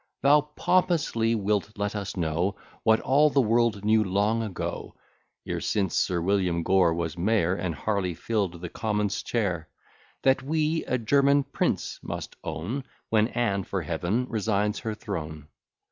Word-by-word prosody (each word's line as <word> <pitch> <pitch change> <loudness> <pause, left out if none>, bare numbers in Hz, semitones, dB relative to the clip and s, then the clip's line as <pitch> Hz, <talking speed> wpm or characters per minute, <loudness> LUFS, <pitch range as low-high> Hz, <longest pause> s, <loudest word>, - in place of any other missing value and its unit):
Thou 145 +2 +6
pompously 150 -6 +1
wilt 105 -1 -1
let 105 +1 -2
us 100 -1 -4
know 85 +3 0 0.3
What 110 0 +4
all 145 +4 +4
the 140 - +2
world 115 -3 +2
knew 110 0 +4
long 105 +4 +1
ago, 105 -5 -5 0.5
(E'er - - -2
since 95 -5 0
Sir 90 -2 +1
William 90 -2 +1
Gore 90 -2 +3
was 85 0 -3
mayor, 95 -2 +2
And 85 -2 -2
Harley 95 +1 -1
fill'd 95 -3 -2
the 90 - -5
commons' 105 -1 -1
chair,) 90 -9 -2 0.5
That 130 0 +4
we 155 +3 0
a 130 - 0
German 140 +4 +3
prince 140 - -2
must - - -6
own, 85 - -4 0.3
When 110 -1 +3
Anne 100 -6 0
for 95 -1 -3
Heaven 85 +10 -1
resigns 105 -2 0
her 110 -1 -4
throne. 75 -7 -6
105 Hz, 150 wpm, -27 LUFS, 90-115 Hz, 0.5 s, Thou